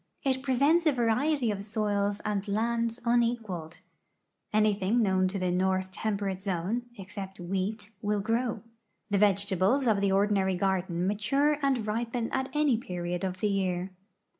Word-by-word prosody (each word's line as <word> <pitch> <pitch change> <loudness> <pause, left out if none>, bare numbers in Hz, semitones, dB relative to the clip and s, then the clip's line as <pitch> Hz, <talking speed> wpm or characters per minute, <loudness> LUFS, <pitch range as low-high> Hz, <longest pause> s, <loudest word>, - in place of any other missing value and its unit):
It 260 -1 +1
presents 280 +6 +3
a - - +6
variety 250 +1 +1
of 200 -1 -4
soils 205 -1 -1
and 205 -1 -1
lands 230 +2 0
unequaled. 230 -9 0 0.7
Anything 215 +1 +2
known 190 -2 +2
to 190 +2 -3
the 185 -1 0
north 185 +1 0
temperate 200 -2 -2
zone, 200 +5 -2
except 195 -1 -8
wheat, 195 +4 -3
will 210 0 0
grow. 225 +1 -1 0.5
The 200 - +3
vegetables 200 +5 +3
of 215 -4 +3
the 200 -1 +2
ordinary 195 -1 +2
garden 180 -2 0
mature 275 +9 +1
and 265 -5 +1
ripen 230 +2 -2
at 265 0 -1
any 295 -5 +2
period 175 -3 -4
of 185 0 -3
the 210 - +2
year. 190 -2 -1
205 Hz, 145 wpm, -29 LUFS, 190-235 Hz, 0.7 s, a